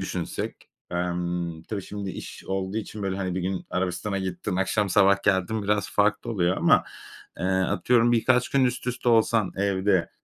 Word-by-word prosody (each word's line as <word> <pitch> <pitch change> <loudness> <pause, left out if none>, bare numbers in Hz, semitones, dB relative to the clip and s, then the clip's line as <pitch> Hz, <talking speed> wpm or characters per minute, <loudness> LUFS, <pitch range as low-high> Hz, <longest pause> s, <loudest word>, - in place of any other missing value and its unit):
düşünsek - - -4 0.2
emm, 85 -1 -2
tabii 100 +2 -5
şimdi 100 0 -5
iş - - -9
olduğu 95 +2 -3
için 105 -1 -5
böyle, 95 -1 -1
hani, 95 -2 -2
bir 95 - -1
gün 95 +1 -3
Arabistan'a 90 +2 -2
gittin, 95 0 -3
akşam, 100 +2 +1
sabah 100 +1 +4
geldin 100 +2 +1
biraz 105 -1 0
farklı 105 +3 +1
oluyor 90 -4 +1
ama, - - +4 0.5
eee, 85 - -3
atıyorum 115 +6 +2
birkaç 125 +2 +3
gün 135 -2 +3
üst 125 0 -1
üste 125 0 -1
olsan 110 -4 +3
evde, 95 -2 +1
100 Hz, 165 wpm, -25 LUFS, 90-105 Hz, 0.5 s, sabah